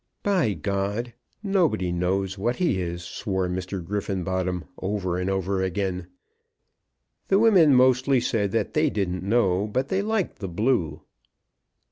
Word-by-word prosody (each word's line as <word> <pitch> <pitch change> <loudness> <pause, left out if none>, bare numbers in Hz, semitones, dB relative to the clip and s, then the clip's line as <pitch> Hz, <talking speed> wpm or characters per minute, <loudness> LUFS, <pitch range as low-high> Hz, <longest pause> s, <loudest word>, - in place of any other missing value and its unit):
"By 185 - +2
G, 100 +7 -2 0.3
nobody 165 - +1
knows 95 +2 -1
what 115 +5 -1
he 160 - 0
is," 85 0 -4
swore 95 0 -2
Mr. 90 0 -4
Griffenbottom 95 -2 -2 0.2
over 95 -2 -2
and 90 +1 -1
over 95 0 -1
again. 95 -1 -2 1.2
The 195 - +4
women 190 - +6
mostly 130 +1 +4
said 105 -4 0
that 115 - -1
they 155 0 +3
didn't 95 -6 -2
know, 100 -2 +1
but 130 +5 -2
they 190 +1 +1
liked 215 -2 -1
the 95 - -4
blue. 85 - 0
100 Hz, 135 wpm, -25 LUFS, 90-125 Hz, 1.2 s, women